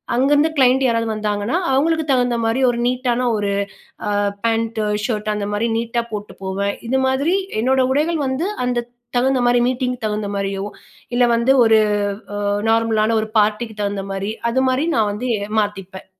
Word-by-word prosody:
அங்கருந்து 290 +5 +3
கிளையண்ட் 260 0 +4
யாராவது 230 -2 +1
வந்தாங்கன்னா, 210 +5 -1
அவங்களுக்கு 315 +4 +2
தகுந்த 245 -2 +2
மாரி 230 +4 +1
ஒரு 240 - -1
நீட்டான 250 0 0
ஒரு 205 -1 -1 0.6
ஆ - - 0 0.3
பேண்ட்டு, 225 -1 0 0.2
ஷர்ட்டு 215 -2 -1
அந்த 205 -1 -3
மாரி 230 +3 0
நீட்டா 235 +1 -1
போட்டு 205 -3 -6
போவேன். 200 +1 -2
இது 265 +2 +1
மாதிரி 280 +8 +1 0.3
என்னோட 260 +2 +2
உடைகள் 315 +3 +1
வந்து, 265 +8 -1 0.2
அந்த 240 -1 -1 0.3
தகுந்த 260 0 +2
மாரி 245 0 +4
மீட்டிங்குக்கு 250 -2 -2
தகுந்த 210 -1 -3
மாரியோ 195 0 -2 0.5
இல்ல 245 - +4
வந்து 240 +3 +3
ஒரு 220 -1 +5 0.7
அ - - +1 0.2
நார்மலான 225 -1 +2
ஒரு 220 - -4
பார்ட்டிக்கு 215 +1 0
தகுந்த 200 -1 -2
மாரி. 195 +2 -3 0.2
அது 260 +2 +1
மாரி 265 +5 0
நான் 215 -2 +2
வந்து 245 +4 -3 0.3
மாத்திப்பேன். 195 -2 -5
230 Hz, 160 wpm, -20 LUFS, 210-255 Hz, 0.7 s, ஒரு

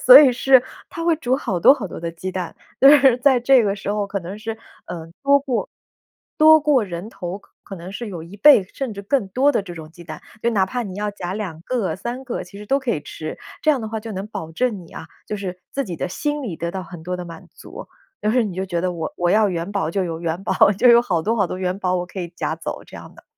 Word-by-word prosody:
所 - - +11
以 275 -4 +6
是 260 +1 +5 0.3
他 330 - -5
会 335 -1 +4
煮 260 -4 0
好 200 -10 -2
多 265 - +8
好 260 -8 -3
多 175 - -8
的 170 0 -3
鸡 175 +3 -6
蛋。 180 -2 -5 0.2
就 270 - +9
是 275 -4 +6
在 260 0 +4
这 250 0 +5
个 200 -1 0
时 195 - -7
候 205 -1 -1
可 200 0 -2
能 185 +3 -7
是， 225 0 -5 0.3
呃， 165 -2 -7 0.2
多 280 0 +5
过 270 -3 -2 0.7
多 315 +1 +8
过 290 -4 +3
人 180 +1 -6
头， 185 -4 -6
可 - - -27
可 195 - -9
能 175 +2 -9
是 230 +3 -5
有 175 -5 -6
1 170 +5 -11
倍 280 -3 +7
甚 265 -4 -3
至 200 - -7
更 205 0 0
多 265 +9 +2
的 205 - +1
这 180 - -9
种 155 -1 -10
鸡 175 +2 -14
蛋， 155 -2 -9 0.2
就 235 - +2
哪 195 -4 +2
怕 245 +6 -3
你 195 -5 -7
要 210 0 -1
夹 180 -2 -5
2 190 -7 -5
个、 235 -4 -1
3 240 +6 -5
个， 245 - -4
其 190 +2 -12
实 210 - -10
都 275 +5 +2
可 265 -3 -2
以 155 - -1
吃。 155 +1 -7 0.2
这 310 - +4
样 280 -4 +1
的 220 - -5
话， 220 0 -4
就 225 +1 -8
能 190 +1 -5
保 160 -7 -7
证 225 +2 -1
你 - - -17
啊， 160 - -8 0.2
就 210 - -4
是 185 -2 -6
自 275 - -2
己 180 - -5
的 180 - -3
心 295 - -2
里 195 -11 -5
得 170 +1 -3
到 190 - -4
很 175 -2 -10
多 180 +2 -3
的 180 - -6
满 165 -1 -11
足， - - -10 0.4
就 210 - +2
是 245 +1 +3
你 200 -4 -4
就 190 +1 -2
觉 175 -2 -2
得 180 +1 -1
我 165 -2 -4
我 175 0 +1
要 215 +2 +4
元 175 0 -3
宝 195 -6 -1
就 190 +2 0
有 165 -2 -4
元 170 +2 -3
宝， - - +4
就 250 - +4
有 235 0 +7
好 175 -8 0
多 220 +7 +1
好 200 - +3
多 185 - -5
元 185 0 -1
宝 185 -2 0
我 180 0 -3
可 190 - -7
以 175 - -4
夹 - - -2
走 - - -6
这 - - -11
样 - - -11
的。 - - -16
200 Hz, 295 characters per minute, -21 LUFS, 175-245 Hz, 0.7 s, 所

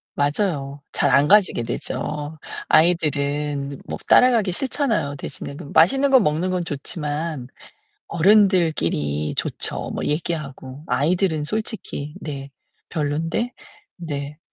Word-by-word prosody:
맞아요. 145 -2 -1
잘 140 - +1
안 140 +3 +5
가지게 190 - +4
되죠. 150 +6 -4 0.3
아이들은 145 -3 +1
뭐 - - -4
따라가기 230 -7 +5
싫잖아요. 230 - -1
대신에 140 0 -7
그 165 - -8
맛있는 270 +12 +5
거 265 - +8
먹는 170 -1 +1
건 180 -1 -1
좋지만 150 -2 -4 0.6
어른들끼리 160 - +2
좋죠, - - -2
뭐 - - -3
얘기하고. 150 -3 -4
아이들은 160 0 +1
솔직히 200 -6 -4
네. 140 -2 -6 0.4
별로인데. 165 - -1 0.4
네. 150 -3 -5
155 Hz, 255 characters per minute, -22 LUFS, 140-185 Hz, 0.6 s, 거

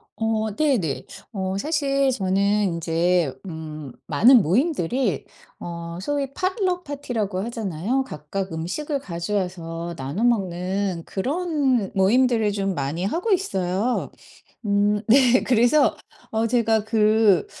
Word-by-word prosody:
어 220 -2 -1
네네. 240 - 0 0.3
어 190 -1 -2
사실 275 -1 +1
저는 200 -1 +1
인제 170 -3 0
음 155 -5 -7 0.2
많은 245 +1 +6
모임들이 235 - 0 0.3
어 170 0 -6
소위 280 +3 -2
포틀럭 370 0 -1
파티라고 225 -10 -3
하잖아요. 225 +2 -2
각각 190 - -5
음식을 230 - -3
가져와서 170 -4 -4
나눠 145 - -4
먹는 190 -4 0
그런 275 - 0
모임들을 220 +2 +3
좀 195 -1 -1
많이 145 +3 -3
하고 345 - -1
있어요. 220 - 0 0.5
음 205 +1 +2
네. 255 -1 +5
그래서 250 +4 +3 0.4
어 225 +1 +1
제가 225 -2 +2
그 215 -2 +3
210 Hz, 230 characters per minute, -23 LUFS, 180-255 Hz, 0.5 s, 많은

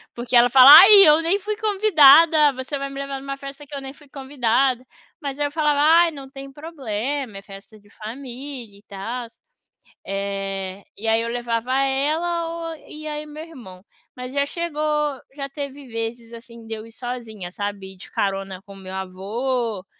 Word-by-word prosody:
porque 240 +1 -3
ela 240 +1 +6
fala: 260 +2 +9
"Ai, 395 +4 +8 0.2
eu 305 +2 +5
nem 360 +5 +1
fui 425 +1 -4
convidada. 330 -8 +5
Você 260 +3 -5
vai 275 0 -4
me 275 0 -8
levar 275 -1 -5
numa 275 0 -6
festa 275 +1 -10
que 290 - -9
eu 275 - -5
nem 270 0 -8
fui 290 -1 -20
convidada" 265 -2 0 0.4
Mas 280 0 -5
aí, 290 - +1
eu - - -9
falava: 300 -2 +1
"Ai, 330 +3 +5
não 275 -3 -10
tem 275 0 -10
problema, 270 -5 -5
é - - -9
festa 200 +2 -14
de 205 0 -24
família 245 -1 -9
e - - -26
tals". 230 +4 -6 0.7
Eh, 195 -1 -4
e 220 +3 -6
aí 225 0 +2
eu 230 - -3
levava 240 +1 -2
ela 310 +6 -1 0.2
ou - - -7
e 310 0 -9
aí, 300 0 -5
meu 305 +1 -9
irmão. 225 - -13 0.3
Mas 250 +1 -8
já 280 0 +1
chegou 300 -4 -2
já 275 -1 -5
teve 280 -1 -8
vezes 230 0 -6
assim, 230 0 -13
de 225 - -6
eu 220 0 -7
ir 230 - -15
sozinha, 230 -6 -7
sabe, 200 -1 -6
ir - - -20
de 185 - -13
carona 195 -1 -3
com 200 -1 -13
meu 190 -1 -10
avô 205 +3 -3
260 Hz, 185 wpm, -22 LUFS, 220-290 Hz, 0.7 s, fala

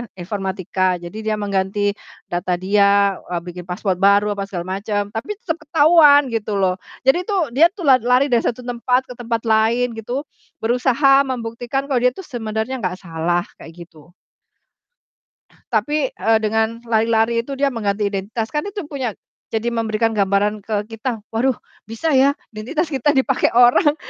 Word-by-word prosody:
informatika 185 -1 -2
jadi 175 0 -8
dia 215 0 -1
mengganti 200 0 -1 0.4
data 175 +1 -1
dia, 200 +1 +3
eee, 175 -1 -3
bikin 180 0 -9
password 180 0 -2
baru 200 +1 +4
apa 195 - -3
segala 185 0 -4
macam, 205 -1 -2
tapi 240 - -4
tetep 335 -8 -3
ketahuan 290 -3 +6
gitu 215 -2 -2
loh, 190 -2 +1 0.3
jadi 305 +8 +3
tuh 370 - 0
dia 310 +7 +6
tuh 365 - -8
la 260 -1 +7
lari 250 +3 +2
dari 235 - +4
satu 245 +1 -2
tempat 250 +1 0
ke - - -5
tempat 230 -1 -2
lain 230 +2 +2
gitu, 245 +6 -4 0.4
berusaha 270 +4 +3
membuktikan 245 +3 -4
kalau 250 - +3
dia 250 - +4
itu 385 - -8
sebenarnya 235 -1 -4
nggak 185 -2 -3
salah 175 +1 -1 0.2
kayak 165 - -12
gitu. 160 0 -19 1.6
Tapi, 270 +6 +1
eee, 225 0 +2
dengan 220 +1 0
lari-lari 225 +1 +2
itu 275 - -9
dia 280 - +3
mengganti 210 -5 -1
identitas, 205 +3 -3
kan 300 0 -2
itu 405 -6 -6
punya 265 -6 -3 0.4
jadi 225 +1 -2
memberikan 225 0 0
gambaran 205 0 +1
ke 205 0 -2
kita, 225 -1 -4
waduh 245 +2 +1 0.3
bisa 230 +9 -2
ya 275 +1 +4 0.2
identitas 300 +10 -3
kita 280 +2 +1
dipakai 265 -1 +2
orang 245 +6 +5
225 Hz, 160 wpm, -20 LUFS, 200-260 Hz, 1.6 s, la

